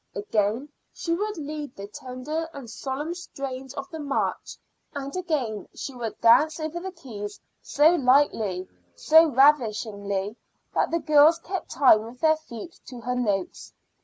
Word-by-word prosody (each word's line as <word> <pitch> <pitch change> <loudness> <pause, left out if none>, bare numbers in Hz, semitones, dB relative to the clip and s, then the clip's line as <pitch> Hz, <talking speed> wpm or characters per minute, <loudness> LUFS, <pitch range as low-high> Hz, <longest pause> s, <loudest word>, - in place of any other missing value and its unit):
Again 210 +6 -1 0.2
she 335 - -3
would 415 +3 -2
lead 300 -3 -6
the 200 - -7
tender 260 +9 -5
and 275 -4 -8
solemn 270 +8 -4
strains 270 -6 -7
of 275 -1 -5
the 320 - -6
march; 280 -2 -2 0.4
and 280 +1 -5
again 280 - -2
she 275 - -6
would 235 -4 -5
dance 305 +8 +5
over 315 +2 -3
the 380 +2 -6
keys 210 - -8 0.2
so 305 +4 +4
lightly, 250 - +2 0.3
so 320 - +6
ravishingly, 220 -7 +2 0.4
that - - +1
the 335 - +1
girls 305 0 +5
kept 370 +2 -5
time 250 -6 +5
with 230 +3 -10
their 315 -1 +4
feet 310 +1 -10
to 245 -2 -9
her 250 +2 -2
notes. 205 -7 -2
275 Hz, 150 wpm, -25 LUFS, 225-315 Hz, 0.4 s, so